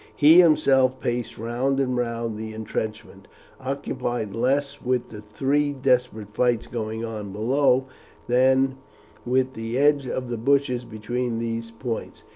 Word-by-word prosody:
He 155 +4 +7
himself 135 -6 +4
paced 120 -2 -3
round 125 +5 -1
and 130 -2 0
round 115 -2 -2
the 110 0 -6
intrenchment, 110 -2 -5 0.3
occupied 130 -5 -3
less 140 +5 0
with 125 -1 -1
the 105 -2 -9
three 140 +7 0
desperate 125 -6 0
fights 120 -1 +1
going 110 -1 -4
on 105 -3 -6
below 130 +5 +2 0.4
than 130 +2 +3 0.5
with 130 +1 +1
the 115 +1 -4
edge 145 -1 +3
of 125 0 -4
the 120 - -2
bushes 125 -1 +1
between 120 +2 -3
those 115 0 -3
points. 115 0 -6
125 Hz, 135 wpm, -24 LUFS, 115-135 Hz, 0.5 s, He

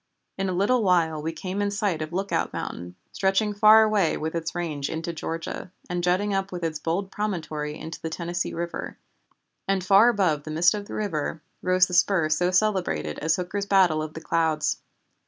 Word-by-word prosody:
In 195 0 -2
a - - -1
little 205 +7 +2
while 170 -6 +2
we 160 +2 -2
came 185 +5 -4
in 205 - +1
sight 200 -5 -1
of 155 +1 -4
Lookout 195 +3 -1
Mountain, 90 +1 -6 0.2
stretching 195 +2 +1
far 215 +2 +7
away 210 -6 +2
with 160 +1 -3
its 165 0 -3
range 155 -5 -3
into 165 +1 -4
Georgia, 165 +2 -5 0.2
and 175 0 -2
jutting 190 +4 +1
up 195 0 -1
with 175 -1 -5
its 160 -2 -2
bold 185 +5 -2
promontory 155 -7 -3
into 160 0 -8
the 160 - -3
Tennessee 175 +2 -3
River, 170 0 -5 0.7
and 195 -1 +1
far 200 +5 +6
above 185 -10 +1
the 155 - -9
mist 165 +4 +4
of 205 -1 -5
the - - -7
river 160 -6 -3 0.2
rose 185 0 +4
the 180 - -8
spur 175 -3 +3
so 175 +3 +2
celebrated 180 - 0
as 160 +1 +1
Hooker's 195 +3 -3
Battle 185 -6 +4
of 155 0 -6
the 160 - -6
Clouds. 160 -2 0
175 Hz, 190 wpm, -25 LUFS, 160-195 Hz, 0.7 s, far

